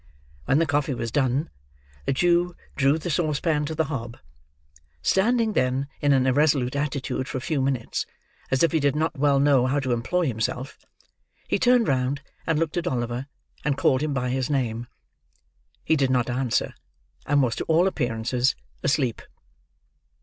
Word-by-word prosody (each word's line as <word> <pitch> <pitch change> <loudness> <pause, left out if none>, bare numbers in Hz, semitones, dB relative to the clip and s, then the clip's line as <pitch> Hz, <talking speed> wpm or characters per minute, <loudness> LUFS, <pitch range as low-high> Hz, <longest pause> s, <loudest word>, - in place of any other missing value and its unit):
When 135 - +3
the 165 - +3
coffee 145 -2 0
was 115 -1 -4
done, 135 - 0 0.6
the - - +2
Jew 175 +3 +2 0.2
drew 140 +2 +3
the 170 +2 -4
saucepan 155 -1 0
to 160 +2 -4
the 160 - +2
hob. 120 -6 -5 0.9
Standing, 225 +2 +2
then 130 0 0
in 145 - +3
an 130 -2 +4
irresolute 135 -1 +2
attitude 140 -2 -2
for 130 - -4
a - - -2
few 140 +2 -1
minutes, 130 -3 -1 0.4
as 130 +2 +2
if 165 - +4
he 160 - +2
did 140 -1 +1
not 160 +2 0
well 140 -1 +3
know 135 -3 +4
how 140 +2 +1
to 130 -2 -2
employ 130 +10 0
himself, 125 +1 -3 0.6
he - - 0
turned 245 -2 +4
round 135 +2 0 0.2
and 165 -2 +2
looked 165 +1 -1
at 175 0 -1
Oliver, 120 -1 -2 0.4
and 140 -1 0
called 130 0 +2
him 155 0 -1
by 125 -2 -1
his 130 +1 -1
name. 120 -4 -1 1.0
He 160 - +2
did 135 -3 +2
not 125 -1 +1
answer, 125 -2 0 0.5
and 145 -1 +3
was 120 -2 0
to - - -2
all 165 +3 +3
appearances 125 -6 0 0.3
asleep. 135 -5 0
140 Hz, 170 wpm, -25 LUFS, 125-155 Hz, 1.0 s, an